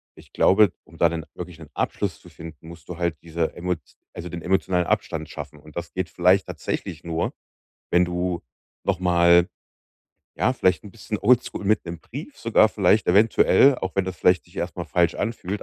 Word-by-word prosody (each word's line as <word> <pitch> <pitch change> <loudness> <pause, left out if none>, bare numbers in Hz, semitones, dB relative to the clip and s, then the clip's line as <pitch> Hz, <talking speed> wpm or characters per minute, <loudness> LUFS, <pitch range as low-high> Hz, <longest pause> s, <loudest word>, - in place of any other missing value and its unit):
Ich - - -17
glaube, 100 0 +5
um - - -18
da - - +5
'nen 80 -2 -5
wirklich 90 -2 -8
'nen 75 -2 -12
Abschluss 100 -3 -2
zu 90 - -16
finden, 80 -1 -12
musst 85 -1 -12
du 90 - -6
halt 85 -3 -1
diese 85 -1 -2
Emot 90 -1 -2 0.3
also 85 0 -7
den 85 0 -6
emotionalen 90 -1 +1
Abstand - - -1
schaffen. 75 - -8
Und 75 0 -16
das 85 0 -6
geht 95 -2 -3
vielleicht 90 +2 +3
tatsächlich 85 -4 -5
nur, 85 0 -2 0.6
wenn 90 +1 +4
du 90 0 -2 0.4
nochmal, 85 -2 +4 0.9
ja, 125 - +1
vielleicht 95 -7 +1
'n 105 - -10
bisschen 105 0 -5
Old 125 +3 +4
School - - -7
mit 105 0 +2
'nem 85 -1 -6
Brief 145 - -9
sogar 110 -1 +4
vielleicht 100 0 +2
eventuell, 110 +7 +5
auch 95 - -4
wenn 95 - +2
das 95 -2 -5
vielleicht 90 0 +3
sich 85 - -21
erstmal 85 0 -4
falsch 85 +2 +2
anfühlt, 105 -3 -3
90 Hz, 190 wpm, -24 LUFS, 85-95 Hz, 0.9 s, glaube